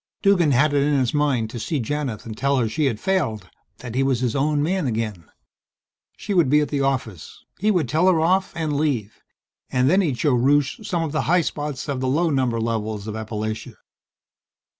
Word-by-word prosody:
Duggan 195 Hz, -6 st, +4 dB
had 140 Hz, +3 st, +3 dB
it 140 Hz, -, +3 dB
in 145 Hz, 0 st, +2 dB
his 130 Hz, -3 st, 0 dB
mind 135 Hz, -7 st, +1 dB
to 120 Hz, -, -6 dB
see 150 Hz, +6 st, -2 dB
Janith 130 Hz, -2 st, -3 dB
and 110 Hz, -2 st, -7 dB
tell 140 Hz, +4 st, +1 dB
her 120 Hz, -3 st, +1 dB
she 110 Hz, +8 st, -1 dB
had 115 Hz, -6 st, 0 dB
failed 135 Hz, -, -1 dB, 0.3 s
that 120 Hz, -1 st, -8 dB
he 130 Hz, -, +1 dB
was 135 Hz, -2 st, +1 dB
his 125 Hz, -3 st, -1 dB
own 145 Hz, +1 st, +1 dB
man 180 Hz, -1 st, 0 dB
again. 110 Hz, -8 st, -3 dB, 0.9 s
She 205 Hz, -, -4 dB
would 170 Hz, -8 st, +3 dB
be 150 Hz, +2 st, +5 dB
at 150 Hz, -, -1 dB
the 145 Hz, -2 st, -1 dB
office. 130 Hz, -, -3 dB, 0.2 s
He 210 Hz, +4 st, +1 dB
would 175 Hz, -, +2 dB
tell 160 Hz, +8 st, +2 dB
her 180 Hz, -3 st, +4 dB
off, 185 Hz, +4 st, +2 dB
and 155 Hz, -3 st, -2 dB
leave. 125 Hz, -9 st, -2 dB, 0.5 s
And 125 Hz, 0 st, +2 dB
then 190 Hz, +2 st, +4 dB
he'd 145 Hz, -9 st, -1 dB
show 145 Hz, 0 st, +2 dB
Rusche 140 Hz, -, +2 dB
some 175 Hz, -5 st, -1 dB
of 160 Hz, -, -3 dB
the 155 Hz, -, 0 dB
high 180 Hz, +1 st, +4 dB
spots 145 Hz, -4 st, -4 dB
of 140 Hz, -3 st, -2 dB
the 130 Hz, -, -1 dB
low 160 Hz, +5 st, +1 dB
number 130 Hz, -4 st, 0 dB
levels 110 Hz, -2 st, -2 dB
of 110 Hz, -, -5 dB
Appalachia. 110 Hz, 0 st, -5 dB
140 Hz, 210 wpm, -22 LUFS, 115-155 Hz, 0.9 s, be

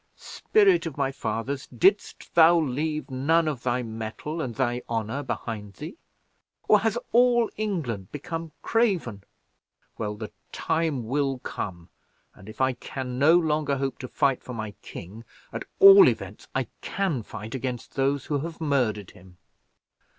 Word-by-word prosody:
Spirit 395 Hz, -, +2 dB
of 150 Hz, -, -7 dB
my 135 Hz, -1 st, 0 dB
fathers, 135 Hz, +3 st, -3 dB
didst 190 Hz, -, +1 dB
thou 170 Hz, +1 st, +7 dB
leave 155 Hz, +1 st, -2 dB
none 155 Hz, +6 st, +2 dB
of 145 Hz, -6 st, -2 dB
thy 125 Hz, 0 st, 0 dB
mettle 115 Hz, +8 st, -5 dB
and 120 Hz, -6 st, -4 dB
thy 120 Hz, 0 st, 0 dB
honour 115 Hz, +4 st, -2 dB
behind 110 Hz, -6 st, -5 dB
thee; 155 Hz, -, -8 dB, 0.7 s
or 210 Hz, -, +6 dB
has 225 Hz, +2 st, 0 dB
all 240 Hz, 0 st, +4 dB
England 155 Hz, -, -3 dB
become 165 Hz, +2 st, -5 dB
craven? 180 Hz, -, 0 dB, 0.8 s
Well, 105 Hz, -1 st, -2 dB
the 105 Hz, 0 st, -7 dB, 0.2 s
time 160 Hz, -7 st, -1 dB
will 135 Hz, +2 st, 0 dB
come, 85 Hz, -7 st, -6 dB, 0.4 s
and 105 Hz, +1 st, -14 dB
if 110 Hz, -, -7 dB
I 130 Hz, 0 st, +3 dB
can 125 Hz, 0 st, -6 dB
no 160 Hz, +5 st, +6 dB
longer 155 Hz, -4 st, +1 dB
hope 135 Hz, -1 st, -3 dB
to 130 Hz, -, -6 dB
fight 135 Hz, 0 st, +1 dB
for 125 Hz, -, -8 dB
my 110 Hz, -2 st, -4 dB
king, 100 Hz, +7 st, -9 dB, 0.3 s
at -, -, -5 dB
all 395 Hz, -1 st, +10 dB
events -, -, -3 dB
I -, -, +1 dB, 0.2 s
can 185 Hz, -10 st, -1 dB
fight 110 Hz, 0 st, -8 dB
against 125 Hz, -2 st, -4 dB
those 135 Hz, 0 st, 0 dB
who 145 Hz, -2 st, -1 dB
have 165 Hz, +3 st, -6 dB
murdered 125 Hz, -, 0 dB
him." 90 Hz, -1 st, -18 dB
135 Hz, 150 wpm, -26 LUFS, 115-160 Hz, 0.8 s, all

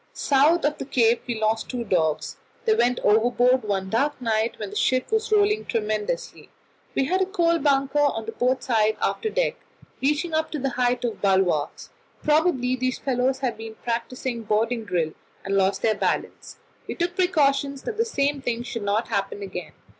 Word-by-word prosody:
South 295 Hz, +5 st, +3 dB
of 295 Hz, 0 st, 0 dB
the -, -, -4 dB
Cape 240 Hz, -3 st, +2 dB
we 235 Hz, -3 st, -2 dB
lost 220 Hz, +1 st, 0 dB
two 245 Hz, -2 st, -3 dB
dogs; 165 Hz, -7 st, 0 dB, 0.3 s
they 445 Hz, -, +4 dB
went 245 Hz, -, +2 dB
overboard 245 Hz, +4 st, +3 dB
one 200 Hz, -3 st, -2 dB
dark 275 Hz, +9 st, 0 dB
night 225 Hz, -1 st, 0 dB
when 210 Hz, -2 st, -6 dB
the -, -, -9 dB
ship 255 Hz, -, +1 dB
was 440 Hz, 0 st, 0 dB
rolling 420 Hz, 0 st, +3 dB
tremendously. 230 Hz, -, -3 dB, 0.5 s
We -, -, +2 dB
had 370 Hz, +7 st, +1 dB
a 375 Hz, -, +2 dB
coal 340 Hz, -4 st, +2 dB
bunker 275 Hz, 0 st, +2 dB
on 275 Hz, -7 st, +1 dB
the 225 Hz, -, -4 dB
port 250 Hz, +3 st, 0 dB
side 220 Hz, -3 st, +2 dB
of -, -, -24 dB
the -, -, +3 dB
after 440 Hz, -, -1 dB
deck, -, -, 0 dB, 0.4 s
reaching 300 Hz, +5 st, 0 dB
up 315 Hz, 0 st, 0 dB
to -, -, -1 dB
the 270 Hz, 0 st, -1 dB
height 245 Hz, 0 st, 0 dB
of 230 Hz, -, -4 dB
the 200 Hz, -, +2 dB
bulwarks; 190 Hz, -6 st, 0 dB, 0.3 s
probably 300 Hz, -5 st, +2 dB
these 255 Hz, 0 st, -1 dB
fellows 260 Hz, 0 st, 0 dB
had 250 Hz, -4 st, -1 dB
been 225 Hz, 0 st, -8 dB
practising 235 Hz, +1 st, -3 dB
boarding 225 Hz, +2 st, 0 dB
drill, 170 Hz, -5 st, -1 dB, 0.3 s
and 195 Hz, 0 st, -1 dB
lost 195 Hz, 0 st, +1 dB
their 220 Hz, -, +3 dB
balance. 210 Hz, -, -3 dB, 0.3 s
We -, -, -4 dB
took 350 Hz, 0 st, -1 dB
precautions 280 Hz, -6 st, +1 dB
that 435 Hz, -, -4 dB
the 455 Hz, -, +3 dB
same 285 Hz, -10 st, -1 dB
thing 240 Hz, -2 st, -2 dB
should 235 Hz, -2 st, -5 dB
not 205 Hz, +3 st, 0 dB
happen 200 Hz, -1 st, -2 dB
again. 180 Hz, -5 st, -7 dB
250 Hz, 190 wpm, -24 LUFS, 220-290 Hz, 0.5 s, they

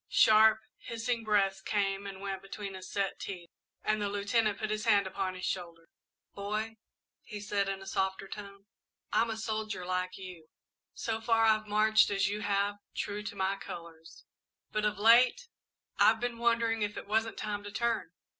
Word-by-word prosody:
Sharp, 220 Hz, 0 st, +6 dB, 0.2 s
hissing 230 Hz, 0 st, -3 dB
breaths 195 Hz, -3 st, +2 dB
came 200 Hz, 0 st, -1 dB
and 195 Hz, -1 st, -8 dB
went 195 Hz, -1 st, -4 dB
between 195 Hz, 0 st, -7 dB
his 185 Hz, -1 st, -9 dB
set 200 Hz, -1 st, -1 dB
teeth 175 Hz, -3 st, -7 dB, 0.3 s
and 215 Hz, 0 st, +1 dB
the 205 Hz, -, 0 dB
Lieutenant 205 Hz, +1 st, +1 dB
put 215 Hz, 0 st, -3 dB
his 215 Hz, +1 st, -2 dB
hand 205 Hz, -3 st, +4 dB
upon 190 Hz, 0 st, -3 dB
his 185 Hz, -, -5 dB
shoulder. 170 Hz, -2 st, -4 dB, 0.4 s
"Boy," 215 Hz, +2 st, -3 dB, 0.4 s
he 210 Hz, -2 st, -8 dB
said, 200 Hz, -1 st, -1 dB
in 195 Hz, 0 st, -4 dB
a -, -, -12 dB
softer 190 Hz, 0 st, -1 dB
tone, 200 Hz, -1 st, -9 dB, 0.5 s
"I'm 230 Hz, -, +3 dB
a 220 Hz, -, -3 dB
soldier, 215 Hz, -4 st, -3 dB
like 185 Hz, 0 st, -2 dB
you. 180 Hz, -4 st, -10 dB, 0.5 s
So 225 Hz, -1 st, -2 dB
far, 225 Hz, 0 st, +3 dB
I've 215 Hz, -1 st, +3 dB
marched 215 Hz, +1 st, +4 dB
as 195 Hz, -1 st, +2 dB
you 205 Hz, +1 st, -2 dB
have, 205 Hz, 0 st, 0 dB, 0.2 s
true 205 Hz, 0 st, -3 dB
to 210 Hz, -1 st, -6 dB
my 190 Hz, 0 st, 0 dB
colours, 165 Hz, -3 st, -10 dB, 0.5 s
but 215 Hz, 0 st, 0 dB
of 210 Hz, -1 st, 0 dB
late, 245 Hz, -, +5 dB, 0.5 s
I've 220 Hz, 0 st, +6 dB
been 240 Hz, -1 st, -3 dB
wondering 230 Hz, -1 st, +2 dB
if 205 Hz, 0 st, -1 dB
it -, -, -6 dB
wasn't 220 Hz, +2 st, 0 dB
time 205 Hz, -1 st, -3 dB
to 205 Hz, -, -7 dB
turn. 230 Hz, -4 st, -1 dB
205 Hz, 175 wpm, -31 LUFS, 195-220 Hz, 0.5 s, Sharp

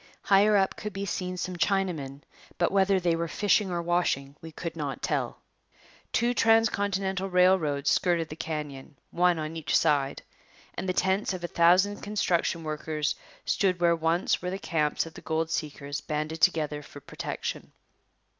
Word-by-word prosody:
Higher 205 Hz, +1 st, +5 dB
up 190 Hz, -1 st, +1 dB
could 210 Hz, -1 st, -5 dB
be 195 Hz, +1 st, -3 dB
seen 180 Hz, -1 st, -3 dB
some 180 Hz, 0 st, -3 dB
Chinamen, 160 Hz, -6 st, -1 dB, 0.4 s
but 175 Hz, -, +1 dB
whether 195 Hz, 0 st, +3 dB
they 170 Hz, -2 st, +1 dB
were 165 Hz, 0 st, -2 dB
fishing 200 Hz, +2 st, +2 dB
or 170 Hz, -1 st, -2 dB
washing 165 Hz, -5 st, 0 dB
we 165 Hz, -1 st, -9 dB
could 165 Hz, +1 st, -6 dB
not 145 Hz, -6 st, -4 dB
tell. -, -, -1 dB, 0.7 s
Two 240 Hz, +1 st, +2 dB
transcontinental 200 Hz, -5 st, +2 dB
railroads 180 Hz, -6 st, +3 dB
skirted 170 Hz, -3 st, +1 dB
the 155 Hz, -, -7 dB
canyon, 150 Hz, -3 st, -6 dB
one 180 Hz, 0 st, +3 dB
on 155 Hz, +1 st, -4 dB
each 150 Hz, -3 st, +1 dB
side, 145 Hz, -3 st, +1 dB, 0.5 s
and 190 Hz, -, -4 dB
the -, -, +1 dB
tents 190 Hz, +2 st, +1 dB
of 180 Hz, -, -8 dB
a -, -, -1 dB
thousand 180 Hz, +5 st, +4 dB
construction 175 Hz, -5 st, 0 dB
workers 155 Hz, 0 st, -2 dB, 0.3 s
stood 185 Hz, -3 st, +1 dB
where 170 Hz, -1 st, +4 dB
once 165 Hz, +2 st, +1 dB
were 180 Hz, -, -3 dB
the 190 Hz, -, -3 dB
camps 155 Hz, -6 st, 0 dB
of 165 Hz, -, -10 dB
the -, -, -11 dB
gold 160 Hz, 0 st, -1 dB
seekers 145 Hz, -3 st, -4 dB
banded 155 Hz, +2 st, -3 dB
together 150 Hz, -4 st, +2 dB
for 145 Hz, -, -12 dB
protection. -, -, -5 dB
170 Hz, 165 wpm, -28 LUFS, 155-190 Hz, 0.7 s, Higher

